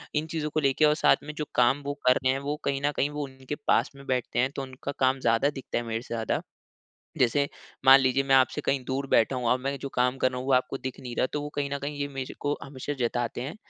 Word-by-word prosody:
इन 150 Hz, -, +1 dB
चीज़ों 155 Hz, -2 st, -2 dB
को 155 Hz, -, +2 dB
लेके 140 Hz, +1 st, +3 dB
और 150 Hz, -, +5 dB
साथ -, -, +4 dB
में 150 Hz, -, -7 dB
जो 150 Hz, -1 st, -3 dB
काम 125 Hz, +4 st, +4 dB
वो 145 Hz, -, -1 dB
कर 125 Hz, -, +7 dB
रहे 130 Hz, -, +4 dB
हैं 135 Hz, -, -2 dB
वो 145 Hz, +2 st, -2 dB
कहीं 140 Hz, 0 st, 0 dB
न 145 Hz, -, +2 dB
कहीं 145 Hz, -, +2 dB
वो 150 Hz, 0 st, -4 dB
उनके 130 Hz, +1 st, -6 dB
पास -, -, +3 dB
में 140 Hz, 0 st, -13 dB
बैठते 125 Hz, -2 st, -1 dB
हैं 130 Hz, +2 st, +3 dB
तो 140 Hz, -, -3 dB
उनका 130 Hz, +1 st, -6 dB
काम 130 Hz, 0 st, +3 dB
ज़्यादा 115 Hz, +3 st, +2 dB
दिखता 135 Hz, -4 st, -5 dB
है 120 Hz, -, -1 dB
मेरे 115 Hz, 0 st, -3 dB
से 120 Hz, -, -8 dB
ज़्यादा। 115 Hz, -2 st, -1 dB, 0.8 s
जैसे 140 Hz, +3 st, +2 dB, 0.4 s
मान 135 Hz, +1 st, +10 dB
लीजिए 130 Hz, +1 st, +2 dB
मैं 135 Hz, 0 st, +3 dB
आपसे 130 Hz, +3 st, +3 dB
कहीं 135 Hz, -2 st, +1 dB
दूर 135 Hz, +2 st, -2 dB
बैठा 120 Hz, +3 st, +3 dB
हूँ 125 Hz, -1 st, -2 dB
और 125 Hz, -, +3 dB
मैं 140 Hz, +2 st, -2 dB
जो 140 Hz, -, -4 dB
काम 125 Hz, +1 st, +2 dB
कर 130 Hz, -, +2 dB
रहा 125 Hz, -, -5 dB
हूँ 130 Hz, -, -6 dB
वो 135 Hz, -, +2 dB
आपको 130 Hz, +1 st, +1 dB
दिख 130 Hz, -1 st, -6 dB
नहीं 125 Hz, -2 st, -6 dB
रहा -, -, +2 dB
तो 150 Hz, -, -1 dB
वो 145 Hz, -, -4 dB
कहीं 140 Hz, -1 st, -2 dB
न 140 Hz, -, -2 dB
कहीं 145 Hz, +1 st, -4 dB
ये 145 Hz, -, -1 dB
मेरे 135 Hz, -2 st, -6 dB
को 145 Hz, 0 st, 0 dB
हमेशा 140 Hz, +1 st, -5 dB
जताते 120 Hz, 0 st, -1 dB
हैं 140 Hz, +10 st, -5 dB
135 Hz, 280 wpm, -27 LUFS, 125-145 Hz, 0.8 s, मान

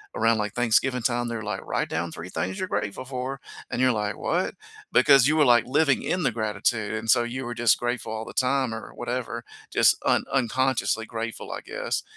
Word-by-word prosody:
around, 115 Hz, 0 st, +3 dB
like, 105 Hz, -1 st, -2 dB
Thanksgiving 125 Hz, +2 st, +2 dB
time, 120 Hz, 0 st, 0 dB
they're 115 Hz, -1 st, -4 dB
like, 105 Hz, -2 st, -4 dB
"Write -, -, -1 dB
down 85 Hz, +1 st, -2 dB
3 85 Hz, -, -7 dB
things 190 Hz, -, -3 dB
you're 185 Hz, -, -2 dB
grateful 105 Hz, +5 st, -3 dB
for," 130 Hz, +1 st, -4 dB, 0.3 s
and 125 Hz, -, -2 dB
you're 130 Hz, -, +5 dB
like, 105 Hz, -1 st, -2 dB
"What?" 180 Hz, +3 st, -1 dB, 0.4 s
Because 140 Hz, -3 st, +6 dB
you 155 Hz, +1 st, +2 dB
were, 150 Hz, -, +5 dB
like, 120 Hz, -2 st, +5 dB
living 140 Hz, +1 st, +2 dB
in 180 Hz, -2 st, -1 dB
the 125 Hz, -, +2 dB
gratitude, 110 Hz, 0 st, -1 dB
and 110 Hz, +1 st, -4 dB
so 120 Hz, -, +5 dB
you 125 Hz, +2 st, -4 dB
were 120 Hz, -, -4 dB
just 115 Hz, -2 st, +4 dB
grateful 120 Hz, -1 st, -2 dB
all 110 Hz, 0 st, -4 dB
the -, -, -9 dB
time 130 Hz, -2 st, +1 dB
or 110 Hz, -, -9 dB
whatever, 120 Hz, -1 st, -4 dB, 0.3 s
just -, -, +5 dB
un -, -, +2 dB
unconsciously 125 Hz, -4 st, +1 dB
grateful, 115 Hz, 0 st, -5 dB
I -, -, -5 dB
guess. -, -, -3 dB
120 Hz, 205 wpm, -25 LUFS, 110-130 Hz, 0.4 s, Because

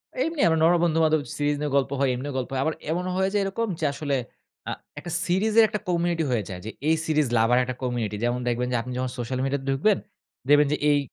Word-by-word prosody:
এমনি 330 Hz, -, -1 dB
আমরা 160 Hz, -1 st, +3 dB
নরমাল 170 Hz, +1 st, +5 dB
বন্ধু-বান্ধব 160 Hz, -2 st, +3 dB, 0.2 s
সিরিজ 145 Hz, 0 st, +1 dB
নিয়ে 150 Hz, -2 st, -1 dB
গল্প 140 Hz, 0 st, 0 dB
হয়, 135 Hz, -2 st, +2 dB
এমনিও 140 Hz, +2 st, -5 dB
গল্প 125 Hz, -, -3 dB
হয়। 130 Hz, -, 0 dB
আবার 160 Hz, -, +1 dB, 0.2 s
এমনও 180 Hz, +2 st, -1 dB
হয়ে 190 Hz, 0 st, +2 dB
যায় 205 Hz, -, +2 dB
এরকম 220 Hz, +4 st, -2 dB
যে, 155 Hz, -, 0 dB
আসলে 145 Hz, -1 st, -2 dB, 0.5 s
আ -, -, -2 dB, 0.3 s
একটা 175 Hz, +2 st, -7 dB
সিরিজের 215 Hz, +5 st, +4 dB
একটা 210 Hz, -, -3 dB
community 170 Hz, -1 st, +1 dB
হয়ে 110 Hz, -4 st, +1 dB
যায়। 90 Hz, -1 st, -6 dB
যে -, -, -4 dB, 0.2 s
এই 160 Hz, -, +4 dB
series 150 Hz, -3 st, +2 dB
lover 115 Hz, +2 st, +3 dB
রা -, -, +5 dB
একটা 130 Hz, -1 st, -4 dB
community। 120 Hz, -4 st, -2 dB
যেমন 120 Hz, +1 st, +1 dB
দেখবেন 120 Hz, +1 st, 0 dB
যে, -, -, 0 dB
আপনি 125 Hz, +2 st, -7 dB
যখন 130 Hz, -1 st, -2 dB
সোশ্যাল 125 Hz, +2 st, -3 dB
মিডিয়াতে 135 Hz, 0 st, -2 dB
ঢুকবেন, 175 Hz, +10 st, +3 dB, 0.5 s
দেখবেন 145 Hz, 0 st, +6 dB
যে -, -, 0 dB
এই 145 Hz, -, +4 dB
145 Hz, 230 wpm, -25 LUFS, 125-175 Hz, 0.5 s, দেখবেন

